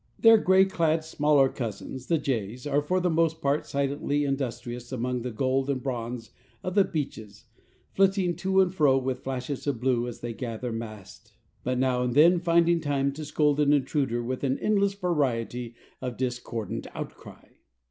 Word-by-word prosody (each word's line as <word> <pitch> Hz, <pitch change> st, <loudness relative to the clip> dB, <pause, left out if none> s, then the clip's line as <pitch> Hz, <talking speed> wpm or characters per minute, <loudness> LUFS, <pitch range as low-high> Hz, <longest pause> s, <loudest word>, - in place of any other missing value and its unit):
Their 225 Hz, 0 st, +7 dB
gay 190 Hz, -1 st, +5 dB
clad 165 Hz, -4 st, +1 dB
smaller 150 Hz, -3 st, +3 dB
cousins, 125 Hz, +1 st, -6 dB
the 165 Hz, -, +3 dB
jays, 125 Hz, -3 st, -3 dB
are 145 Hz, 0 st, +1 dB
for 180 Hz, +6 st, 0 dB
the 180 Hz, -1 st, +1 dB
most 165 Hz, 0 st, +1 dB
part 145 Hz, -1 st, 0 dB
silently 140 Hz, +1 st, -1 dB
industrious 120 Hz, -3 st, -4 dB
among 125 Hz, 0 st, -2 dB
the 125 Hz, -, -3 dB
gold 130 Hz, +3 st, 0 dB
and 135 Hz, -2 st, 0 dB
bronze 120 Hz, -3 st, -4 dB, 0.3 s
of 185 Hz, -, -3 dB
the 200 Hz, 0 st, +5 dB
beeches, 110 Hz, -, -5 dB, 0.5 s
flitting 190 Hz, -2 st, +2 dB
to 190 Hz, 0 st, +3 dB
and 185 Hz, -1 st, +1 dB
fro 145 Hz, -7 st, +4 dB
with 130 Hz, -1 st, -2 dB
flashes 135 Hz, +2 st, -4 dB
of 135 Hz, -5 st, 0 dB
blue 125 Hz, -1 st, +1 dB
as 120 Hz, -, -8 dB
they 120 Hz, -1 st, -4 dB
gather 120 Hz, 0 st, -4 dB
mast, 110 Hz, -3 st, -8 dB, 0.3 s
but 125 Hz, 0 st, -1 dB
now 125 Hz, -1 st, +1 dB
and 125 Hz, 0 st, -1 dB
then 170 Hz, +4 st, +6 dB
finding 170 Hz, 0 st, +3 dB
time 140 Hz, -2 st, 0 dB
to 155 Hz, +3 st, -7 dB
scold 150 Hz, 0 st, +1 dB
an 145 Hz, -1 st, +4 dB
intruder 135 Hz, -4 st, 0 dB
with 130 Hz, +3 st, -4 dB
an 135 Hz, -1 st, +1 dB
endless 200 Hz, -2 st, +1 dB
variety 125 Hz, -, -1 dB, 0.3 s
of 125 Hz, -2 st, -4 dB
discordant 120 Hz, -4 st, -4 dB
outcry. -, -, -9 dB
135 Hz, 170 wpm, -27 LUFS, 125-160 Hz, 0.5 s, Their